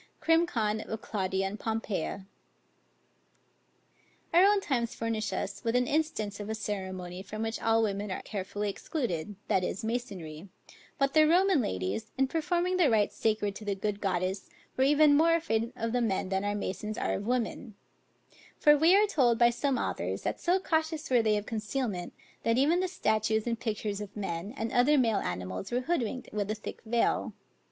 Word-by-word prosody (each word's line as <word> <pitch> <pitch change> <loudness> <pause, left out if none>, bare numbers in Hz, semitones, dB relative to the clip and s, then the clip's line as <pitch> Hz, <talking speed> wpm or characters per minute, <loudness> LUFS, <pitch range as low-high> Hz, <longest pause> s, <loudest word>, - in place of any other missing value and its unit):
CRIM. 330 +1 +3
CON. 220 -7 -1
OF 220 - -5
CLAUDIUS 190 -3 -2
AND 200 +2 -4
POMPEIA. 210 -4 -3 2.1
Our 350 +2 +7
own 405 +1 +5
times 245 -10 -1
furnish 225 -1 -2
us - - -4
with 230 0 0
an 250 0 +3
instance 280 -9 -1
of 205 0 -6
a 220 - -1
ceremony 190 -4 -5
from 215 +3 -5
which 225 0 -3
all 225 0 +3
women 205 -1 -2
are 185 - -4
carefully 205 0 -4
excluded; 205 - -3
but 190 - +2
the 220 - -2
Roman 360 -1 +4
ladies, 95 - -3
in 270 0 +3
performing 350 +4 0
the 340 -6 +4
rites 215 -3 +2
sacred 215 -2 0
to - - -10
the 205 -1 -1
good 205 +1 -3
goddess, 185 0 -1 0.3
were 260 - +2
even 295 +1 +5
more 330 +3 +5
afraid 230 -8 0
of 230 0 -2
the 245 +1 +1
men 195 -4 0
than 190 0 0
our 205 0 -1
masons 210 +1 -4
are - - -1
of 200 - -4
women; 240 -2 -2 0.8
for 295 0 +6
we 325 +5 +5
are 415 +1 +6
told 260 - +2
by 235 0 +5
some 270 +2 0
authors, - - -2
that - - -2
so 360 +2 +2
cautious 320 -4 -1
were 245 -2 +5
they 215 -1 +2
of 205 - -4
concealment, 215 -4 -3 0.3
that 230 +1 +1
even 305 +7 +3
the 370 - +1
statutes 220 - 0
and 230 -2 -1
pictures 210 -3 -3
of 205 0 -8
men 190 -1 -4
and 225 +1 -2
other 265 +5 +4
male 230 -5 +3
animals 90 +1 -4
were 245 +1 +1
hood 340 +3 0
winked 240 +3 -4
with 205 -1 -2
a 215 - 0
thick 215 - -8
veil. 235 +1 +1
225 Hz, 180 wpm, -29 LUFS, 200-275 Hz, 2.1 s, Our